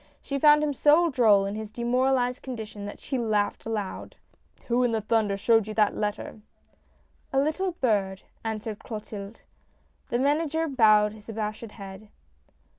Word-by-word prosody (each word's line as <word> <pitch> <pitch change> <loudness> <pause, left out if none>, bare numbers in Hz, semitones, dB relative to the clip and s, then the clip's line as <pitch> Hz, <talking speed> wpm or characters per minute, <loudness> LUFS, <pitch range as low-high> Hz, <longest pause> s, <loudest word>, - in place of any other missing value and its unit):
She 275 -1 -4
found 300 +1 +6
him 295 -1 0
so 305 +5 +4
droll 215 -6 +4
in 200 - -3
his 215 0 -6
demoralized 250 +2 0
condition, 220 -5 -7
that 205 - -8
she 265 - -3
laughed 215 -3 -1
aloud. 210 -4 -4 0.2
" - - -32
Who 240 +1 +2
in 230 -2 +1
thunder 215 -2 0
showed 225 +1 +3
you 215 - -6
that 210 -2 +2
letter? 210 +1 -4 0.3
" - - -38
" - - -41 0.3
A 270 - +2
little 325 +6 0
bird," 200 - 0 0.2
answered 220 -1 -4
Clotilde. 210 -1 -8 0.7
The 240 - 0
Manager 310 +4 +1
bowed 215 -6 +4
his 215 0 -14
abashed 215 0 -5
head. 195 0 -10
225 Hz, 160 wpm, -26 LUFS, 210-265 Hz, 0.7 s, found